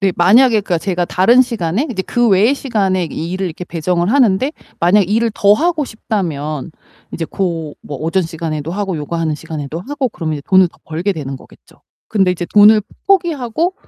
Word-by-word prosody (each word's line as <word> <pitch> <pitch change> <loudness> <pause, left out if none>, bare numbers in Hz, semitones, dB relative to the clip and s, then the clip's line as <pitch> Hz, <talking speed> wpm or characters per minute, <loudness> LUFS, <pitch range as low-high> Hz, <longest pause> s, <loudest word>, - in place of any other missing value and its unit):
네, 195 -2 +1
만약에 220 +6 +5
그러니까 185 -3 -1
제가 180 0 -1
다른 230 +10 +4
시간에 230 - 0
이제 190 -6 -2
그 240 +4 +1
외의 210 +6 +4
시간에 195 -9 0
일을 175 +4 -4
이렇게 175 +1 -6
배정을 175 +3 -1
하는데 260 0 +3 0.3
만약에 180 +3 +3
일을 225 +4 +1
더 205 -1 +4
하고 320 +4 0
싶다면 160 - -4 0.4
이제 165 - -3
고 165 -4 -3
뭐 145 - -7
오전 165 +6 0
시간에도 160 -2 -4
하고 195 -2 -2
요거하는 155 +1 -2
시간에도 150 +1 -6
하고 270 +5 -3
그러면 160 -7 -4
이제 145 - -7
돈을 185 -1 +5
더 - - -25
벌게 170 +6 -2
되는 140 -6 -6
거겠죠. - - -19 0.3
근데 195 -4 +2
이제 180 -1 -3
돈을 210 +1 +7 0.3
포 395 - +7
포기하고 330 0 -2
190 Hz, 400 characters per minute, -16 LUFS, 165-225 Hz, 0.4 s, 돈을